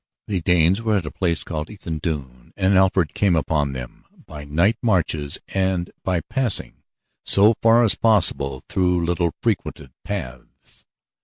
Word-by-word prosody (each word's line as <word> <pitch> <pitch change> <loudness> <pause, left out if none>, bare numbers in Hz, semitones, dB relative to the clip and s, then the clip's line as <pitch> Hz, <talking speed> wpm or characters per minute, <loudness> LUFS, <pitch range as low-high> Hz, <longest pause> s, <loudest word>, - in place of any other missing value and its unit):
The 95 -4 -2
Danes 90 +4 +3
were 110 -2 +1
at 90 - -3
a - - -5
place 85 -4 -1
called 75 -2 -5
Ethandune, 75 - -6
and 95 0 +2
Alfred 95 -3 +2
came 100 -4 +2
upon 75 -3 0
them 60 -2 -9 0.2
by 75 -1 -9
night 85 +10 +1
marches 80 - 0 0.2
and 95 -2 -1
by 90 -3 0
passing 125 - -1 0.4
so 105 +3 +4
far 115 +1 +5
as 110 -6 +5
possible 80 - +1
through 90 -2 +1
little 85 -1 -1
frequented 85 - -2
paths. 60 0 -8
90 Hz, 145 wpm, -22 LUFS, 75-100 Hz, 0.4 s, far